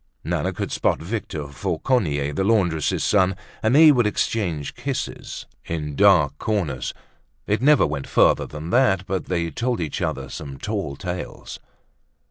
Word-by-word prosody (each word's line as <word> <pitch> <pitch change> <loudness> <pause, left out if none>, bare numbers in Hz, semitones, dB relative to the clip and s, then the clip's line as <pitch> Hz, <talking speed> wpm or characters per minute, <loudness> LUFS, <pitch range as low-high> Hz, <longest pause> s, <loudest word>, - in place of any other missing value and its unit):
Nana - - -1
could - - -4
spot - - +1
Victor 85 -5 -4
Fauconnier, 80 - -1
the 85 - 0
laundress's 95 -7 +1
son 95 -2 +3 0.3
and 110 +4 +2
they 155 0 +9
would 120 -6 +3
exchange 90 -9 -1
kisses 130 +1 -5 0.2
in 75 -3 -4
dark 70 - +4
corners. 80 - -1 0.5
It 105 +3 0
never 145 +2 +5
went 70 -2 -4
farther - - +3
than 75 +3 -7
that, 95 -7 +3
but 95 -1 -2
they 85 -2 -1
told 120 - -1
each 80 -4 -3
other 70 -1 -2
some 70 -1 -7
tall 100 -6 -3
tales. 90 +3 -6
90 Hz, 145 wpm, -23 LUFS, 75-110 Hz, 0.5 s, they